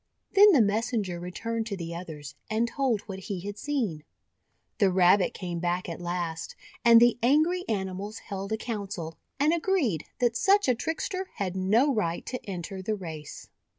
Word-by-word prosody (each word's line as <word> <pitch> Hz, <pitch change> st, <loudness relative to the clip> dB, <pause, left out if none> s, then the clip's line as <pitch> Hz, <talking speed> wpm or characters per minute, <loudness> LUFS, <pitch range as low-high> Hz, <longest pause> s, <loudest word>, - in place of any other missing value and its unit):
Then 410 Hz, +1 st, +8 dB
the 275 Hz, -, +6 dB
messenger 210 Hz, -3 st, -1 dB
returned 225 Hz, +6 st, -3 dB
to 200 Hz, -3 st, -4 dB
the 170 Hz, -1 st, -5 dB
others, 155 Hz, -5 st, -7 dB, 0.2 s
and 225 Hz, +2 st, +1 dB
told 245 Hz, -4 st, 0 dB
what 195 Hz, -2 st, -7 dB
he 190 Hz, -1 st, -5 dB
had 205 Hz, +2 st, -6 dB
seen. 225 Hz, -, -2 dB, 0.8 s
The 200 Hz, -3 st, +5 dB
Rabbit 180 Hz, +1 st, +4 dB
came 175 Hz, -2 st, -4 dB
back 175 Hz, +1 st, -1 dB
at 170 Hz, 0 st, -6 dB
last, 175 Hz, -2 st, -3 dB, 0.3 s
and 235 Hz, -1 st, +8 dB
the 240 Hz, 0 st, +4 dB
angry 310 Hz, +9 st, +3 dB
animals 200 Hz, +1 st, -3 dB
held 195 Hz, -1 st, -6 dB
a 220 Hz, -, +1 dB
council, 200 Hz, -8 st, -5 dB, 0.2 s
and 300 Hz, +3 st, +4 dB
agreed 320 Hz, -, +1 dB
that 240 Hz, -1 st, +1 dB
such 395 Hz, +9 st, +4 dB
a 255 Hz, -, +5 dB
trickster 330 Hz, +8 st, -3 dB
had 190 Hz, -2 st, -3 dB
no 220 Hz, +10 st, +3 dB
right 170 Hz, -7 st, -1 dB
to 255 Hz, -, -5 dB
enter 190 Hz, +1 st, -5 dB
the 215 Hz, +3 st, -1 dB
race. 160 Hz, -6 st, -8 dB
205 Hz, 170 wpm, -28 LUFS, 180-240 Hz, 0.8 s, Then